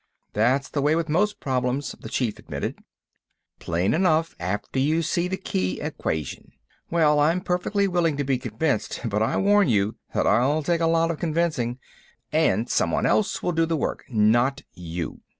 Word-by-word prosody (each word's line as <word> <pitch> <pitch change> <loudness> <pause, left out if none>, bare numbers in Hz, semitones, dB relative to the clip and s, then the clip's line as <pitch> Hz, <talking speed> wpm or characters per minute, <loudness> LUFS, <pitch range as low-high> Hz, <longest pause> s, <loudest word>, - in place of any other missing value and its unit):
"That's 130 +6 +2
the 145 - -2
way 150 +3 +3
with 165 -1 -1
most 205 +7 +1
problems," 130 +1 -1
the - - -8
Chief 120 -5 -1
admitted. - - -5 0.8
"Plain 85 +4 0
enough 165 -2 +2
after 100 +8 -3
you 155 +5 +2
see 170 +3 0
the 190 +1 -2
key 95 - -2
equation. 80 -3 -4 0.4
Well, 155 -3 +3
I'm 160 +5 +3
perfectly 185 +3 0
willing 170 -5 +1
to 145 - 0
be 135 -2 0
convinced, 125 +5 -2
but 105 -2 0
I 110 - +1
warn 205 -2 +4
you 105 -2 +1 0.2
that - - +2
I'll 130 +9 +3
take 170 +2 0
a 165 - +3
lot 165 0 +2
of 160 - -6
convincing—and 130 - -1
someone 220 - +1
else 215 - +1
will 180 - +1
do 165 0 +1
the 165 -1 0
work, - - -3
not 120 +5 +2
you." 85 -1 -6
145 Hz, 170 wpm, -24 LUFS, 115-170 Hz, 0.8 s, warn